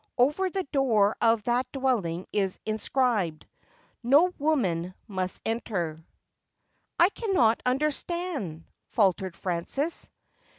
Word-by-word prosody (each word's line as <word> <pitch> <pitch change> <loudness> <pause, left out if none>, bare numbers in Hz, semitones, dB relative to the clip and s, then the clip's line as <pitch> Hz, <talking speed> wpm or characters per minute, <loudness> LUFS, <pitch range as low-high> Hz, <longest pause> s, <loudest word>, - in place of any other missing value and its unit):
Over 300 +10 +3
the 380 +1 -2
door 230 -8 +2
of 225 -2 +3
that 245 +3 0
dwelling 220 -11 -1
is 195 -3 0
inscribed, 215 - 0 0.3
" - - -33
no 290 +9 +4
woman 185 - 0
must 185 -3 -3
enter." 175 -9 -2 0.4
' - - -53
' - - -43
I 345 +2 +7
cannot 375 - +2
understand,' 285 - -2 0.3
faltered 190 -4 +2
Frances. 190 - -2
230 Hz, 115 wpm, -27 LUFS, 185-285 Hz, 0.4 s, I